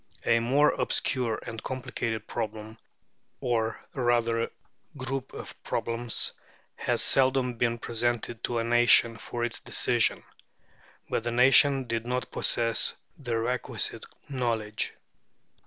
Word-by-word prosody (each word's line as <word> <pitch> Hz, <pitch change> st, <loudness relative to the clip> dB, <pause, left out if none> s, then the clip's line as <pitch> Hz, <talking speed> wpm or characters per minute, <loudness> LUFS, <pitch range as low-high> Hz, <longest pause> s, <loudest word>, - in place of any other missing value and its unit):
A 115 Hz, -, +4 dB
more 135 Hz, +6 st, +4 dB
obscure 120 Hz, -4 st, 0 dB
and 115 Hz, -1 st, -6 dB
complicated 125 Hz, -4 st, -3 dB
problem, 110 Hz, -1 st, -5 dB, 0.6 s
or 115 Hz, -2 st, 0 dB
rather 120 Hz, -2 st, +1 dB, 0.5 s
group 130 Hz, 0 st, -4 dB
of -, -, -8 dB
problems, 115 Hz, 0 st, -1 dB, 0.4 s
has -, -, 0 dB
seldom 130 Hz, -1 st, +3 dB
been 120 Hz, -1 st, +1 dB
presented 120 Hz, 0 st, -2 dB
to 120 Hz, -, -2 dB
a 115 Hz, -, +1 dB
nation 120 Hz, 0 st, +5 dB
for 120 Hz, +1 st, -5 dB
its 115 Hz, -1 st, -5 dB
decision. -, -, +1 dB, 0.8 s
But -, -, -1 dB
the 120 Hz, -, -1 dB
nation 135 Hz, +3 st, +5 dB
did 115 Hz, 0 st, -3 dB
not 125 Hz, +1 st, -2 dB
possess 115 Hz, -1 st, +2 dB, 0.2 s
the 120 Hz, -5 st, -2 dB
requisite 125 Hz, +2 st, -2 dB, 0.2 s
knowledge. 115 Hz, -5 st, -2 dB
120 Hz, 115 wpm, -28 LUFS, 115-125 Hz, 0.8 s, nation